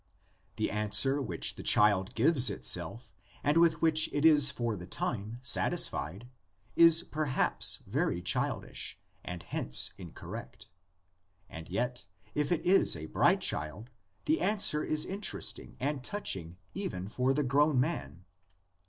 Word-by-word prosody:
The - - -2
answer 105 +7 +2
which 90 -11 -1
the - - -7
child 105 +1 +3
gives 135 -7 +3
itself 100 - -3 0.3
and 145 +1 +2
with 165 -1 +3
which 155 -1 +4
it 145 +2 0
is 150 -3 +7
for 120 -5 -3
the 90 -2 -9
time 110 +3 -4
satis 125 - +2
fied, 90 - -6 0.5
is 165 0 +6
perhaps 150 -5 -1
very - - -1
childish, 90 - -2 0.2
and 90 -1 -7
hence 65 - +1
incorrect, 85 -7 -10 0.8
and 80 0 -9
yet, 120 +2 -3 0.3
if 150 +1 -1
it 175 - 0
is 190 - +4
a 80 -1 -7
bright - - +3
child 90 - -3 0.3
the 315 +2 +1
answer 195 -7 +2
is 155 0 +1
interesting 200 +2 -5
and 140 +1 -2
touching 95 - -5 0.2
even 100 - -5
for 125 +5 0
the 145 +2 0
grown 140 +1 +2
man. 85 - -3
125 Hz, 135 wpm, -30 LUFS, 95-150 Hz, 0.8 s, is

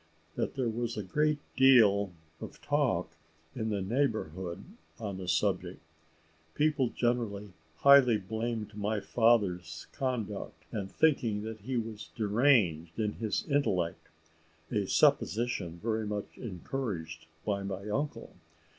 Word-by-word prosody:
That - - -2
there 130 -3 0
was 115 +1 -2
a 105 - -2
great 150 +10 +1 0.2
deal 110 -7 +6 0.3
of - - -9
talk 140 - 0 0.4
in 110 0 -2
the 100 -3 -1
neighbourhood 95 - -2 0.3
on 100 -5 -5
the 95 - -6
subject - - 0 0.8
people 150 -4 +2
generally 115 -5 -1 0.3
highly 140 -5 +7
blaming 110 +2 -3
my 105 +1 -1
father's 95 -7 +1
conduct 120 -7 -4
and 100 -3 -4
thinking 120 -10 +2
that 110 0 -6
he 125 +5 -3
was 110 -2 -5
deranged 105 - +2
in 105 -1 0
his 110 -2 -2
intellect, 95 - 0 0.6
a 105 -2 0
supposition 105 -8 +2
very 110 -1 -1
much 105 -1 -4
encouraged 90 -6 -5 0.2
by 100 -2 0
my 100 +1 -5
uncle. 145 +8 -3
110 Hz, 120 wpm, -31 LUFS, 100-120 Hz, 0.8 s, highly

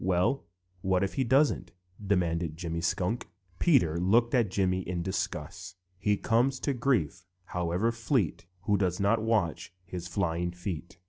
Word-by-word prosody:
"Well, 95 +9 +1 0.4
what 95 0 +2
if 95 - -1
he 135 - +1
doesn't?" 135 +5 +2 0.3
demanded 85 -5 0
Jimmy 85 -1 -3
Skunk. 90 +7 -1 0.3
Peter 120 - +4
looked 115 +6 +3
at 120 -6 +3
Jimmy 95 -1 +1
in 90 -1 -3
disgust: 95 -1 -4 0.2
"He 105 +1 +2
comes 125 +6 +2
to 140 - 0
grief, 95 - 0 0.2
however 90 +5 0
fleet, 115 - -1
Who 100 +2 +2
doesn't 100 +4 +1
watch 105 - 0
his 90 -1 -6
flying 85 -1 -1
feet. 90 -1 -6
95 Hz, 140 wpm, -29 LUFS, 85-115 Hz, 0.4 s, Peter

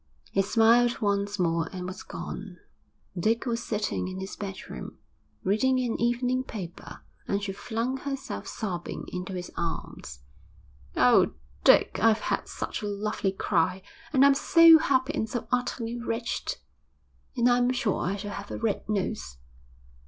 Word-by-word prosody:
He 195 - +3
smiled 230 +4 +4
once 200 -1 0
more 165 -3 +1
and 180 -2 -5
was 185 +3 -6
gone. 190 -2 -7 0.6
Dick 220 +8 +1
was 235 -2 -1
sitting 210 -4 -2
in 185 0 -5
his 190 +1 -6
bedroom, 195 -2 -7 0.5
reading 255 +7 +2
an 245 -3 -1
evening 245 +2 +1
paper, 185 -9 -8 0.3
and 200 0 -1
she 200 - -2
flung 230 +6 -2
herself 270 - -5
sobbing 180 -5 -4
into 180 +1 -5
his 180 -1 -5
arms. 115 - -5 0.8
'Oh, - - +5 0.3
Dick, - - +5
I've 225 -1 +4
had - - -1
such - - -4
a 210 - -3
lovely 205 -1 -1
cry, 185 -1 0 0.3
and 275 -2 +5
I'm 280 - +7
so 330 +3 +7
happy 270 -1 +1
and 220 -7 -1
so 235 -1 -4
utterly 240 -1 -1
wretched. 230 0 -3 0.8
And 240 0 +4
I'm 245 0 +4
sure 240 -6 0
I 190 +3 -1
shall 205 0 -5
have 200 0 -7
a - - -4
red 225 -1 -2
nose.' 70 - -2
215 Hz, 150 wpm, -27 LUFS, 190-245 Hz, 0.8 s, I'm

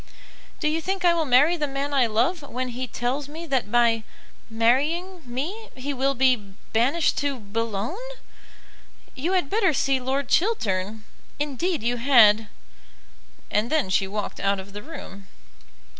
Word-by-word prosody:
"Do 305 - 0
you 315 +2 0
think 380 +2 -2
I 345 - +6
will 330 -2 0
marry 280 +7 +5
the 300 -2 -1
man 275 +1 -3
I 260 -4 +4
love 245 +11 +1
when 255 -2 -4
he 250 +1 -4
tells 255 +4 -2
me 320 +3 -7
that 260 -9 -1
by 235 -1 +3 0.5
marrying 295 +11 +1
me, 345 - -4
he 270 +2 -4
will 275 +1 0
be 240 -7 +1 0.2
banished 270 +9 +2
to 285 -2 -1
Bou 225 +2 -3
logne? 220 - -3 1.1
You 325 +8 -2
had 360 -6 +1
better 390 -1 +2
see 270 0 +2
Lord 265 +1 -2
Chiltern; 220 - 0 0.3
indeed 295 +1 -2
you 240 +1 0
had." 225 -4 +6 1.0
And 215 +3 +1
then 300 -12 +1
she 195 0 +2
walked 205 +1 -4
out 200 0 +1
of 195 +1 -10
the 205 - -6
room. 200 -9 -10
260 Hz, 160 wpm, -24 LUFS, 225-310 Hz, 1.1 s, I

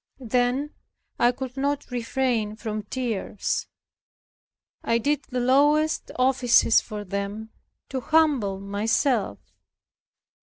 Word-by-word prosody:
Then 250 +4 0 0.5
I 240 - +5
could 255 0 -7
not 280 0 -2
refrain 240 -3 -1
from 215 -1 -4
tears. 215 -3 -3 1.2
I 230 - +2
did 290 +5 0
the 250 - -2
lowest 290 +5 +3
offices 255 -3 +4
for 210 -2 -7
them 200 +3 -5 0.4
to 265 - -2
humble 265 -10 +2
myself. 205 - 0
245 Hz, 100 wpm, -25 LUFS, 215-265 Hz, 1.2 s, I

